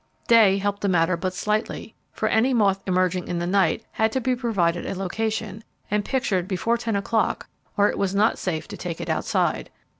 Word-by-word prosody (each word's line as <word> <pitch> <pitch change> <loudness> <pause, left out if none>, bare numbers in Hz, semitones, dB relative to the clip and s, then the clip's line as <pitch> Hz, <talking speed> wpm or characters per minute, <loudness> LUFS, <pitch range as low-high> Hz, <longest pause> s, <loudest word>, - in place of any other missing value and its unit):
Day 215 -4 +6
helped 200 0 -2
the 200 - +1
matter 175 0 +2
but 185 +2 -2
slightly, 210 +4 -2 0.2
for - - -2
any 245 +4 +2
moth 195 -4 +2
emerging 185 -1 +1
in 175 - -2
the 170 - -2
night 185 -3 +1
had 220 0 +1
to 260 - +1
be 255 0 0
provided 190 -9 0
a - - -4
location, 215 +2 -3 0.3
and 210 0 +1
pictured 200 -8 -1
before 205 +5 0
ten 225 -2 -2
o'clock 215 +3 0 0.3
or 205 0 +5
it - - -2
was 195 -1 0
not 210 +3 +2
safe 165 -4 -3
to - - -7
take 175 -2 -5
it 170 -1 -3
outside. 160 - 0
200 Hz, 200 wpm, -24 LUFS, 180-220 Hz, 0.3 s, Day